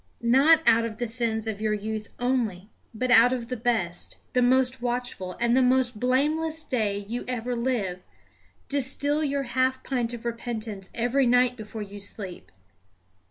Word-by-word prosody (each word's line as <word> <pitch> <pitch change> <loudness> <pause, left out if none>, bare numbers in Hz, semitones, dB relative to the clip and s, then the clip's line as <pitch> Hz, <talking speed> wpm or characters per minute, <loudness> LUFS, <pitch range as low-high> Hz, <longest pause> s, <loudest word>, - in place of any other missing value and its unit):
Not 285 +7 +5
out 230 +1 +5
of 225 -2 -4
the 240 - -2
sins 225 -1 -1
of 215 -2 -4
your 215 -1 +1
youth 215 +1 -4
only, 230 -6 -1 0.2
but 250 +3 -2
out 245 +1 +7
of 240 -2 -4
the 250 - -2
best, 220 -8 -1 0.2
the 250 - +3
most 255 0 +2
watchful, 240 -7 -3
and 235 0 +2
the 260 - +5
most 250 -3 +2
blameless 305 +6 +1
day 205 -7 -1
you 240 +3 -4
ever 245 0 -2
live, 230 -7 -1 0.7
distil 285 +2 0
your 280 -1 0
half 260 +1 0
pint 245 -3 -1
of 235 - -11
repentance 225 -4 -4
every 245 +3 +2
night 245 0 +4
before 215 -1 -7
you 205 0 -9
sleep. 195 -2 -4
240 Hz, 160 wpm, -26 LUFS, 220-255 Hz, 0.7 s, out